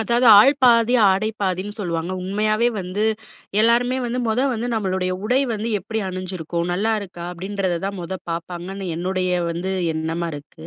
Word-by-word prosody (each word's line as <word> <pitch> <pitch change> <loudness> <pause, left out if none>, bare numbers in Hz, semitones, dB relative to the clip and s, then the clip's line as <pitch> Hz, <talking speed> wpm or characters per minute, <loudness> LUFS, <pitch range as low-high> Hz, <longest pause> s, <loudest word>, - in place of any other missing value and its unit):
அதாவது 235 +3 +2
ஆள் 265 +7 +7
பாதி 235 -1 +5 0.2
ஆடை 200 +3 +1
பாதின்னு 195 +2 -2
சொல்வாங்க. 170 -2 -2
உண்மையாவே 215 +4 +1
வந்து 185 +3 -2 0.6
எல்லாருமே 240 +3 +3
வந்து 240 +1 -2
மொத 225 +2 +1
வந்து 235 0 -3
நம்மளுடைய 185 -3 -1
உடை 250 +4 +2
வந்து 220 +1 -3
எப்பிடி 220 +4 -4
அணிஞ்சிருக்கோம், 180 -2 -4
நல்லாயிருக்கா? 195 -3 -2
அப்பிடின்றத 185 0 -2
தான் 200 0 -3
முத 185 +2 -5
பார்ப்பாங்கன்னு 175 +3 -5
என்னுடைய 185 +1 -1 0.2
வந்து 175 +3 -3 0.2
எண்ணமா 165 +2 -2
இருக்கு. 145 - -11
190 Hz, 145 wpm, -22 LUFS, 175-220 Hz, 0.6 s, ஆள்